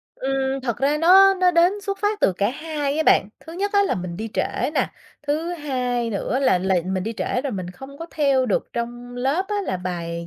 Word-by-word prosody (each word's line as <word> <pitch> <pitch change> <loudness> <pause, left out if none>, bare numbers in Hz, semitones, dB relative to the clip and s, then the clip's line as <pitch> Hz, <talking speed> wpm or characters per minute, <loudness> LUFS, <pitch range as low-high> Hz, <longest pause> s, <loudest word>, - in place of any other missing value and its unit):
Ừm, 270 0 -1
thật 235 -3 -2
ra 285 +3 +2
nó 385 +4 +7
nó 365 -1 +3
đến 345 +1 +4
xuất 395 -1 -4
phát 415 +1 -1
từ - - +4
cả 200 +4 0
hai 295 0 -3
á 315 - +2
bạn. 195 - +5
Thứ 325 - -11
nhất 400 +3 -2
á 405 -1 +5
là 395 - 0
mình 175 -2 -5
đi 220 +3 -4
trễ 255 - -1
nè, - - +1 0.4
thứ 315 +4 -1
hai 250 -6 -2
nữa 220 +4 -1
là 265 -9 +3
là 190 +1 +1
mình 190 -1 -1
đi 225 +3 -3
trễ 250 - -1
rồi 275 -4 -3
mình 185 -2 -4
không 270 +9 -12
có 330 - -6
theo 275 -4 +2
được 205 - 0
trong 240 +1 -5
lớp 275 +9 0
á 420 - -2
là - - -2
bài 170 -2 -4
270 Hz, 235 wpm, -22 LUFS, 220-330 Hz, 0.4 s, nó